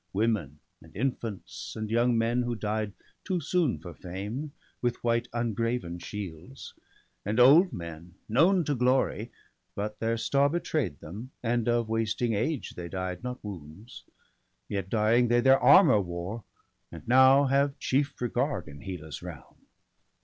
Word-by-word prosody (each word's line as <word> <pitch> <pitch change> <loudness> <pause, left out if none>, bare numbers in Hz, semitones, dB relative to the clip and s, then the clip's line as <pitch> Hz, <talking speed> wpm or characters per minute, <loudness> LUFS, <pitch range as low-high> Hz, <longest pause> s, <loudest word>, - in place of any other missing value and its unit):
Women, 100 -9 0 0.2
and - - -18
infants, 115 -4 -4
and 110 -1 -4
young 120 +1 +3
men 115 +2 +1
who 120 -1 -2
died 105 -1 -2 0.3
Too 185 -3 -1
soon 165 -2 +1
for 85 -2 -10
fame, 105 - -6 0.3
with 120 -1 -1
white 120 0 +1
ungraven 115 -5 -2
shields; 100 - -8 0.5
And 105 +4 -1
old 155 +9 +7
men, 85 0 -8
known 170 - +4
to 150 - -1
glory, 125 -2 +1 0.4
but 105 +1 -4
their 115 0 0
star 140 +4 +2
Betray'd 150 - -2
them, 105 +11 -8
and 120 0 0
of 120 -1 +1
wasting 115 +1 0
age 120 +7 -1
they 85 -1 -7
died, 95 -1 -4
Not 125 0 -5
wounds; 100 +3 -10 0.6
yet, 100 -2 -3
dying, 115 +3 +3
they 120 +1 +3
their 135 +2 +5
armour 135 - +7
wore, 90 +4 -5 0.5
And - - -11
now 130 +3 +6
have 140 +1 +1
chief 140 +2 0
regard 125 - -1
in 70 -1 -11
Hela's 80 -6 -7
realm. - - -11
115 Hz, 145 wpm, -28 LUFS, 100-130 Hz, 0.6 s, old